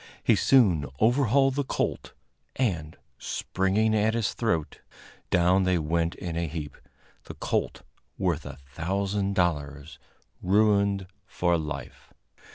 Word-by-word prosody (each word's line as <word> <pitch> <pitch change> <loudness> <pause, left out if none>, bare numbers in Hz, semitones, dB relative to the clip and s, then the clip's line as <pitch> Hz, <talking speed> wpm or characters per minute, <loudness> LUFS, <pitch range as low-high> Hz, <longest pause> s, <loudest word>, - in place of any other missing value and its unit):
He - - +4
soon 95 - +4
overhauled 135 +3 +3
the 145 +1 -1
colt, - - -3 0.4
and, 85 -12 -2 0.2
springing 100 +4 0
at 110 +1 +2
his 110 -5 0
throat, 85 -10 -2 0.5
down 90 +2 +3
they 95 -1 +2
went 85 +1 -1
in 85 -2 -5
a 85 0 -1
heap 75 -2 -6 0.5
the - - -9
colt, - - -2 0.3
worth - - -1
a - - -8 0.2
thousand 100 +4 -1
dollars, 75 -4 -2 0.4
ruined 100 0 +2 0.2
for 85 -1 +1
life. 75 -2 -6
95 Hz, 120 wpm, -27 LUFS, 85-110 Hz, 0.5 s, He